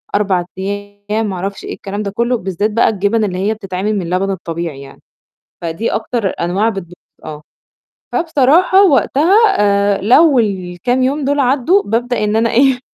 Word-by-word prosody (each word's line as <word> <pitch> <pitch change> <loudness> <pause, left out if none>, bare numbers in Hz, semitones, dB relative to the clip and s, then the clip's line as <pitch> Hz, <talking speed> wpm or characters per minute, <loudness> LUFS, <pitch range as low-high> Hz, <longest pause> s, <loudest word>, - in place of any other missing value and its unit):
4 190 -4 0
أيام، 205 +2 -4
ما 190 - -4
أعرفش 195 +2 -5
إيه - - -6
الكلام 205 +1 -6
ده 200 - -4
كله، 235 +3 0
بالذات 195 +2 -2
بقى 230 - +3
الجبن 210 +2 0
اللي 185 -3 -2
هي 205 +4 0
بتتعمِل 200 0 -3
من 175 -3 -4
لبن 190 +2 0
الطبيعي 170 -5 -5
يعني، 135 0 -14 0.6
فدي 170 +7 -3
أكتر 220 -2 -2
أنواع 190 +6 0
بتبو 185 -5 -6 0.3
آه، 150 -1 -8 0.7
فبصراحة 335 +4 +3
وقتها 305 +4 +2 0.2
آآ 200 -1 +2
لو 275 +6 +5
الكام 200 +4 -1
يوم 280 +3 0
دول 285 +1 +1
عدّوا، 275 +9 +2
بابدأ 240 +1 -1
إن 210 +1 0
أنا 230 0 +2
إيه؟ 265 +1 +3
210 Hz, 160 wpm, -15 LUFS, 190-245 Hz, 0.7 s, لو